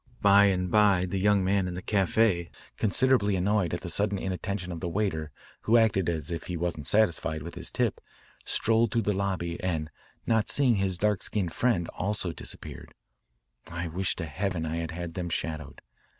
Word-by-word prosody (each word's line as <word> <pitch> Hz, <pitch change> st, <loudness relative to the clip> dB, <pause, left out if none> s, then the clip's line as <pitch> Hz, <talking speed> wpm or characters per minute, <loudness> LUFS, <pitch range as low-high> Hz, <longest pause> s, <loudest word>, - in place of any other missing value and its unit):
By 100 Hz, 0 st, +7 dB
and 90 Hz, -2 st, 0 dB
by 100 Hz, -4 st, +4 dB
the 95 Hz, +1 st, -3 dB
young 100 Hz, 0 st, +3 dB
man 95 Hz, 0 st, +1 dB
in 90 Hz, -, -5 dB
the 90 Hz, -, -5 dB
caf=82, 95 Hz, -3 st, +1 dB, 0.3 s
considerably 110 Hz, -2 st, +2 dB
annoyed 95 Hz, -1 st, +1 dB
at 85 Hz, -, -3 dB
the -, -, -7 dB
sudden 100 Hz, +2 st, +1 dB
inattention 95 Hz, 0 st, -4 dB
of 85 Hz, -, -5 dB
the 90 Hz, -, -3 dB
waiter 85 Hz, -5 st, -1 dB, 0.4 s
who 115 Hz, +2 st, +5 dB
acted 100 Hz, -6 st, +2 dB
as 80 Hz, -2 st, -3 dB
if 85 Hz, -, -5 dB
he 90 Hz, -, -3 dB
wasn't 85 Hz, -4 st, -1 dB
satisfied 80 Hz, -, +3 dB
with 85 Hz, -, -7 dB
his -, -, -4 dB
tip, -, -, -1 dB, 0.4 s
strolled 115 Hz, 0 st, +1 dB
through 115 Hz, -, +1 dB
the 105 Hz, -, +1 dB
lobby 95 Hz, -3 st, -2 dB
and 80 Hz, -4 st, -2 dB, 0.3 s
not 110 Hz, -2 st, +1 dB
seeing 130 Hz, -6 st, +4 dB
his 95 Hz, -2 st, 0 dB
dark 105 Hz, +1 st, +1 dB
skinned 90 Hz, -6 st, -1 dB
friend, 105 Hz, -9 st, +1 dB
also 100 Hz, -3 st, -3 dB
disappeared. -, -, -8 dB, 0.7 s
I 85 Hz, 0 st, -4 dB
wish 95 Hz, +3 st, -1 dB
to 85 Hz, -, -4 dB
heaven 90 Hz, +2 st, -3 dB
I 80 Hz, +1 st, -3 dB
had 85 Hz, -1 st, -3 dB
had 85 Hz, 0 st, -6 dB
them 90 Hz, 0 st, -4 dB
shadowed. 80 Hz, -3 st, -4 dB
95 Hz, 185 wpm, -28 LUFS, 85-105 Hz, 0.7 s, By